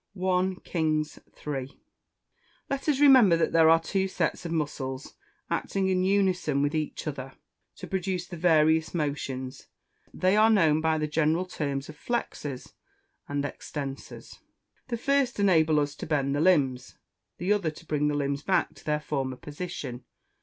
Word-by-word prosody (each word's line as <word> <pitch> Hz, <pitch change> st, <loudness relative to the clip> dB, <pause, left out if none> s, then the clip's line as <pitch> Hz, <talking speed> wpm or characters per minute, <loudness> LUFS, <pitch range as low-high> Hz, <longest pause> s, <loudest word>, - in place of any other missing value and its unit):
I 185 Hz, 0 st, +1 dB
KINGS 155 Hz, -2 st, -1 dB, 0.3 s
III.] 135 Hz, -2 st, -4 dB, 0.9 s
Let 275 Hz, +2 st, -1 dB
us 280 Hz, -3 st, +2 dB
remember 260 Hz, -12 st, +7 dB
that 165 Hz, -, +1 dB
there 160 Hz, -1 st, +5 dB
are 165 Hz, 0 st, +6 dB
two 190 Hz, +3 st, -1 dB
sets 185 Hz, -, -2 dB
of -, -, -6 dB
muscles, 140 Hz, -4 st, -3 dB, 0.3 s
acting 195 Hz, -1 st, -1 dB
in 185 Hz, -1 st, +2 dB
unison 185 Hz, -7 st, +1 dB
with 145 Hz, +1 st, 0 dB
each 155 Hz, -1 st, -3 dB
other, 135 Hz, -3 st, -5 dB, 0.4 s
to -, -, -8 dB
produce 185 Hz, -1 st, -2 dB
the 175 Hz, -, -8 dB
various 160 Hz, -1 st, +3 dB
motions; 135 Hz, -4 st, -3 dB, 0.4 s
they 185 Hz, +2 st, +2 dB
are 215 Hz, +1 st, +5 dB
known 160 Hz, -8 st, +4 dB
by 160 Hz, 0 st, +2 dB
the 155 Hz, -, -1 dB
general 160 Hz, +3 st, +1 dB
terms 140 Hz, -6 st, -3 dB
of 155 Hz, -, -10 dB
flexors 150 Hz, -, -4 dB, 0.6 s
and 145 Hz, 0 st, -1 dB
extensors; 140 Hz, -1 st, -7 dB, 0.5 s
the 240 Hz, -2 st, -2 dB
first 275 Hz, -1 st, +1 dB
enable 160 Hz, -6 st, +4 dB
us 145 Hz, -1 st, -1 dB
to -, -, -6 dB
bend 140 Hz, -3 st, 0 dB
the 145 Hz, -, 0 dB
limbs, 140 Hz, -8 st, +2 dB, 0.4 s
the 185 Hz, +4 st, +1 dB
other 200 Hz, -6 st, 0 dB
to 155 Hz, +2 st, -12 dB
bring 150 Hz, -1 st, 0 dB
the 150 Hz, -, 0 dB
limbs 140 Hz, -1 st, -1 dB
back 190 Hz, +4 st, +1 dB
to -, -, -17 dB
their 150 Hz, 0 st, -1 dB
former 135 Hz, -3 st, -2 dB
position. 145 Hz, -6 st, -6 dB
160 Hz, 160 wpm, -27 LUFS, 145-185 Hz, 0.9 s, remember